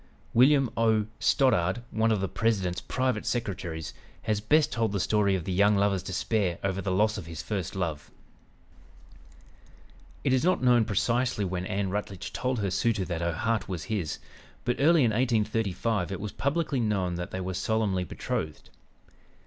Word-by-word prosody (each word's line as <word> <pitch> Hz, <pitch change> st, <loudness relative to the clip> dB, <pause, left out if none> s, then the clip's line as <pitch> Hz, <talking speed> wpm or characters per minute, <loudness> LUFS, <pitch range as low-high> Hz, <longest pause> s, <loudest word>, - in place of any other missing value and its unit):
William 135 Hz, +2 st, +5 dB
O. 110 Hz, -2 st, +3 dB
Stoddard, 120 Hz, -5 st, +2 dB
one 110 Hz, +1 st, +2 dB
of 105 Hz, -3 st, +1 dB
the 95 Hz, -, 0 dB
President's 95 Hz, -4 st, 0 dB
private 130 Hz, -4 st, -1 dB
secretaries, 90 Hz, -9 st, -3 dB, 0.3 s
has 105 Hz, -2 st, 0 dB
best 150 Hz, +8 st, +3 dB
told 115 Hz, -3 st, 0 dB
the 100 Hz, -, 0 dB
story 100 Hz, 0 st, +2 dB
of 90 Hz, -, -3 dB
the 95 Hz, -, -4 dB
young 100 Hz, +3 st, +4 dB
lover's 100 Hz, -1 st, +2 dB
despair 95 Hz, 0 st, -1 dB
over 95 Hz, 0 st, -1 dB
the 100 Hz, -, -3 dB
loss 105 Hz, +3 st, +2 dB
of 85 Hz, -, -9 dB
his 85 Hz, -1 st, -6 dB
first 95 Hz, -3 st, -3 dB
love: 80 Hz, -6 st, -3 dB, 2.1 s
"It -, -, +2 dB
is 130 Hz, -, +2 dB
not 180 Hz, -6 st, +2 dB
known 120 Hz, -2 st, +5 dB
precisely 120 Hz, +1 st, 0 dB
when 90 Hz, 0 st, -3 dB
Ann 95 Hz, -1 st, -1 dB
Rutledge 100 Hz, -2 st, -4 dB
told 125 Hz, +1 st, -1 dB
her 100 Hz, -2 st, -1 dB
suitor 100 Hz, 0 st, +1 dB
that 85 Hz, -2 st, -3 dB
her 85 Hz, 0 st, 0 dB
heart 110 Hz, +4 st, -1 dB
was 90 Hz, -5 st, -4 dB
his, 90 Hz, -8 st, -2 dB, 0.5 s
but 125 Hz, -, 0 dB
early 160 Hz, +1 st, +5 dB
in 115 Hz, -, +3 dB
1835 110 Hz, -4 st, 0 dB
it 95 Hz, -, -4 dB
was 105 Hz, 0 st, -4 dB
publicly 145 Hz, -1 st, -1 dB
known 100 Hz, -6 st, 0 dB
that 90 Hz, +1 st, -4 dB
they 95 Hz, -, -5 dB
were 95 Hz, 0 st, -3 dB
solemnly 95 Hz, 0 st, 0 dB
betrothed. 80 Hz, -2 st, -4 dB
105 Hz, 170 wpm, -28 LUFS, 95-115 Hz, 2.1 s, William